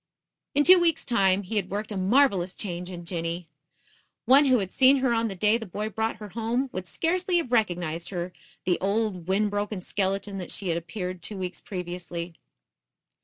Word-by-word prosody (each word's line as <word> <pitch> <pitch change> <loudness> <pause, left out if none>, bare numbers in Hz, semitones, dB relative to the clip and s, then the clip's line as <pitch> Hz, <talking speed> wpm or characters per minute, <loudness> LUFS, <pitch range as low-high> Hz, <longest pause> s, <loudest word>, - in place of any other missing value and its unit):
In 290 - +5
two 365 +3 +8
weeks 335 -2 +2
time 195 -5 +3
he 210 +4 -3
had 195 -3 -1
worked 210 +2 -3
a - - -3
marvelous 195 -2 +3
change 180 -3 -4
in 175 -2 -8
Jinny. 170 0 -3 0.8
One 275 +3 +7
who 255 -2 +5
had 190 -4 -2
seen 265 +1 +5
her 260 -2 +2
on 230 0 +1
the 195 - -5
day 210 +5 +3
the 225 - -7
boy 210 +4 -3
brought 220 +2 -1
her 210 -1 -9
home, 235 +5 -1
would 185 -1 -4
scarcely 360 - +1
have 325 -8 -2
recognized 175 -7 0
in 185 - -4
her 175 +1 -4 0.3
the 180 -1 +1
old, 200 -3 -1
wind 205 +2 +1
broken 205 0 -2
skeleton 195 +1 -2
that 180 - -6
she 195 -3 -3
had 165 - +1
appeared 180 +1 -6
two 205 +4 -5
weeks 180 -1 -5
previously. 175 -4 -5
200 Hz, 195 wpm, -26 LUFS, 180-230 Hz, 0.8 s, two